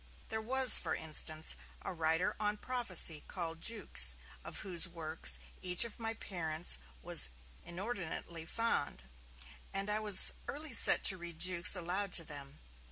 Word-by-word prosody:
There 220 0 -4
was, 260 +2 +8
for - - -5
instance, 155 0 0 0.3
a - - -4
writer 165 +1 -2
on 210 0 -3
prophecy 195 -11 +1
called 165 -3 -6
Jukes, 65 - +1 0.3
of - - -8
whose 180 -2 -4
works 165 -2 0 0.2
each 180 +4 +3
of 230 - -11
my 225 0 -5
parents 165 - 0 0.2
was - - +3 0.3
inordinately 175 -3 -8
fond, 230 - -4 0.7
and 195 +1 -4
I 210 - -2
was 210 -3 +6
early 295 -1 -7
set - - +3
to 185 - +3
read 170 -1 -10
Jukes 180 +3 +3
aloud 185 +3 -4
to 165 - +2
them. 145 -2 -8
180 Hz, 145 wpm, -32 LUFS, 160-210 Hz, 0.7 s, was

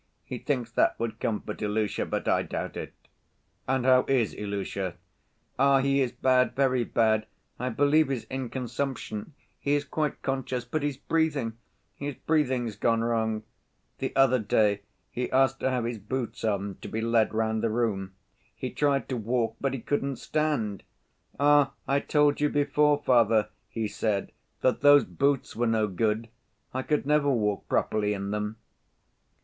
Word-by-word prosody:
He 125 - -6
thinks 125 -5 -2
that - - +2
would 115 -1 -3
comfort 110 0 -3
Ilusha; 105 0 -1
but - - -3
I - - +3
doubt - - -4
it." - - -6 0.7
"And 130 -1 +1
how 130 -1 +6
is 125 -6 +2
Ilusha?" 100 -3 -4 0.6
"Ah, 140 0 +5
he 140 0 +2
is 125 -2 0
bad, 125 +1 +2
very 130 -2 +2
bad! 110 -1 +1 0.3
I 125 +1 -1
believe 145 +4 +3
he's 130 -5 -2
in 130 +1 -5
consumption: 125 0 -4 0.2
he 145 +1 +1
is 145 0 -1
quite 150 +1 -2
conscious, 130 -2 -2
but 150 +6 -2
his 145 -2 -2
breathing! 150 -7 0 0.4
His 140 -1 -5
breathing's 130 -8 0
gone 115 +1 +2
wrong. 110 -2 0 0.6
The - - -2
other 135 -2 +5
day 105 -1 +2 0.3
he 125 0 -3
asked 135 0 +3
to 130 - +1
have 125 -3 -1
his 115 -1 -3
boots 120 +4 -4
on 100 -2 -1
to - - -7
be 110 - -3
led 115 -1 +2
round 110 0 0
the 115 - +1
room. 105 -5 -1 0.4
He - - -4
tried 140 -2 +1
to 130 - -1
walk, 115 +1 -1
but 135 -1 0
he 130 - -6
couldn't 140 0 -1
stand. 125 -7 -1 0.6
'Ah, 145 -1 +4
I 140 +1 +3
told 145 0 +2
you 150 - +3
before, 145 0 +3
father,' 110 -3 +4 0.2
he 110 -2 -2
said, 105 -1 -1 0.3
'that 130 - +2
those 145 0 +7
boots 140 -1 0
were 120 +1 +1
no 110 -1 +2
good. 110 +3 0 0.5
I 130 - -1
could 150 +2 0
never 150 0 +3
walk 105 -6 0
properly 105 -1 +1
in 100 0 -4
them. 105 +1 -2
125 Hz, 165 wpm, -27 LUFS, 110-140 Hz, 0.7 s, those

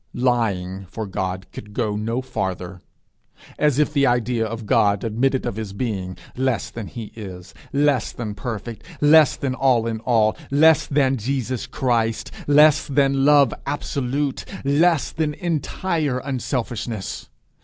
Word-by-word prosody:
Lying 100 -7 0
for 110 - -5
God 95 -1 -3
could 105 0 -10
go 110 -4 0
no 115 +4 -2
farther. 90 -6 -4 0.8
As 150 -3 +3
if 150 0 +2
the 140 -2 +3
idea 120 -1 +1
of 110 0 -5
God 100 -1 +2
admitted 125 +4 0
of 100 - -3
his 110 -3 -5
being 100 -5 -3 0.2
less 130 -3 -1
than 115 -4 -6
he 115 -4 -8
is, 95 -4 -9 0.2
less 140 -3 +2
than 110 -3 -5
perfect, 110 +1 -6 0.2
less 150 0 +6
than 135 -2 -2
all 130 -3 +2
in 115 -1 -2
all, 110 -2 +2
less 155 +3 +5
than 135 -2 +2
Jesus 130 0 -2
Christ! 115 -3 0 0.2
less 150 +1 +5
than 135 -1 +2
Love 145 -3 +5
absolute, 140 -1 -2 0.2
less 145 +1 +2
than 150 -1 -1
entire 165 -3 -1
unselfishness! 120 -5 -4
125 Hz, 140 wpm, -22 LUFS, 110-140 Hz, 0.8 s, less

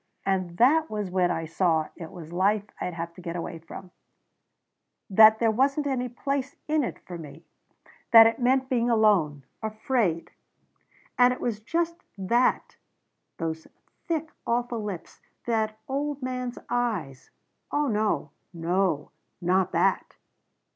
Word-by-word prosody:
And 185 -3 -1
that 305 +8 +4
was 210 -3 -3
when 180 -1 +2
I 165 -2 -2
saw 160 -1 +1
it 165 -2 -8
was 170 -2 -10
life 200 +3 +2 0.2
I'd 180 - -3
have 170 0 -5
to 180 - -13
get 170 -1 -5
away 165 -1 -5
from. 180 +3 -11 1.2
That 220 +2 +8
there 225 -1 +2
wasn't 275 +6 +1
any 255 -3 -1
place 275 +3 -3
in 310 -1 +2
it - - -4
for 175 -2 -7
me. 150 0 -11 0.6
That 225 -1 +10
it 225 0 +2
meant 260 +1 +2
being 245 -2 +1
alone. 200 - +3 0.2
Afraid. 215 -5 -1 0.9
That 250 0 +7
it - - -8
was 225 -4 -2
just 335 +9 -1 0.2
that 235 +6 +1 0.6
those 160 -1 -4 0.4
thick 320 -1 -2 0.2
awful 240 -1 0
lips 200 -5 -7 0.2
that 220 -2 0
old 285 0 -3
man's 250 -1 -3
eyes 200 - -2 0.4
Oh 295 0 +1
no 215 -3 0 0.2
no 170 -2 0 0.3
not 185 +1 +1
that!" - - +1
215 Hz, 140 wpm, -26 LUFS, 175-250 Hz, 1.2 s, That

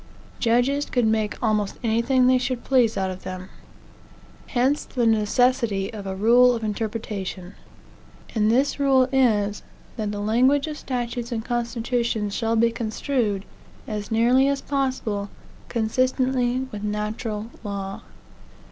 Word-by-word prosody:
Judges 250 +5 +2
could 245 -3 +1
make 220 -1 0
almost 210 -3 0
anything 235 +3 +2
they 255 0 +5
should 255 -1 -2
please 245 -4 +3
out 190 -1 0
of 185 0 -8
them. 185 0 -7 1.0
Hence 260 +3 +1
the 245 -3 -1
necessity 225 -1 +2
of 205 -2 -7
a 190 - -3
rule 240 +5 +5
of 225 - -5
interpretation. 210 -4 -4 0.8
And 215 -2 +2
this 265 +5 +2
rule 265 -2 +4
is, 210 -6 +2 0.4
that 215 -2 -2
the 205 - -4
language 255 +7 +3
of 305 -1 -6
statutes 240 -1 -4
and 225 -1 -3
constitutions 235 -3 -1
shall 225 0 0
be 230 +1 +3
construed, 220 -2 -2 0.4
as 210 -1 -4
nearly 240 +4 +4
as 280 0 +1
possible, 255 -8 -2 0.4
consistently 255 +2 +1
with 210 - -6
natural 210 +1 -3
law. 195 -2 -5
230 Hz, 130 wpm, -24 LUFS, 210-255 Hz, 1.0 s, they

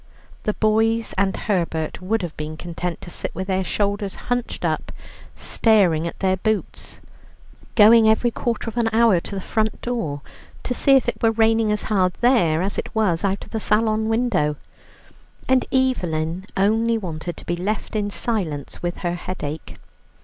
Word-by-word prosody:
The 210 - 0
boys 225 +1 +2
and 195 0 +1
Herbert 170 -6 -2
would 205 +3 -1
have 170 -3 -5
been 155 +1 -6
content 175 +1 -5
to 175 - -9
sit - - -4
with 190 - -3
their 190 0 0
shoulders 200 0 -1
hutched 245 -1 -3
up, - - -1 0.4
staring 185 -8 +2
at - - -8
their 190 -1 +2
boots, 215 +2 -3 0.7
going 220 0 +7
every 235 +2 +3
quarter 230 0 -2
of 225 - -5
an 230 -1 +2
hour 225 -4 +4
to 200 - -7
the - - -2
front 220 +3 -1
door 165 -13 -2 0.4
to 250 - -2
see 275 +2 +4
if 265 - +3
it - - -2
were 225 - +4
raining 225 -1 +3
as 210 - -1
hard 185 -4 +1
there 180 -10 +3
as 200 +2 -2
it - - -6
was 195 -6 +1
out 200 0 -1
of - - -17
the 220 - -2
salon 220 +1 +1
window, 225 -11 +1 0.9
and 260 -1 +3
Evelyn 180 - 0
only 225 +4 +2
wanted 175 -4 -5
to - - -11
be 175 - -1
left 200 +5 -3
in 205 -1 0
silence 180 - -3
with 175 0 -3
her 175 - +1
headache. 165 -4 -6
205 Hz, 170 wpm, -22 LUFS, 175-225 Hz, 0.9 s, going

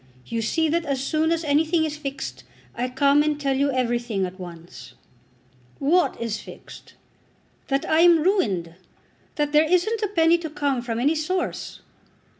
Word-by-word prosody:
You 230 -1 -3
see 320 +9 +1
that 335 +2 0
as 275 -4 -2
soon 315 +3 0
as 335 0 0
anything 315 +2 +2
is 305 -1 -4
fixed, 210 - -6 0.3
I 250 +2 -2
come 280 +3 +3
and 300 -1 0
tell 275 -2 0
you 280 +1 +1
everything 240 -5 -1
at 185 +1 -8
once." 170 -7 -11 0.8
"What 340 +6 +2
is 230 -2 -3
fixed?" - - -13 0.7
"That 275 0 -1
I 315 - +3
am 335 -2 +6
ruined. 200 - 0 0.6
That 295 -1 -1
there 300 +1 +5
isn't 430 +6 +2
a 420 - +1
penny 335 -3 +3
to 325 -2 -5
come 285 -4 -1
from 235 -1 -3
any 285 +6 +2
source." 325 +4 -3
285 Hz, 165 wpm, -23 LUFS, 240-320 Hz, 0.8 s, am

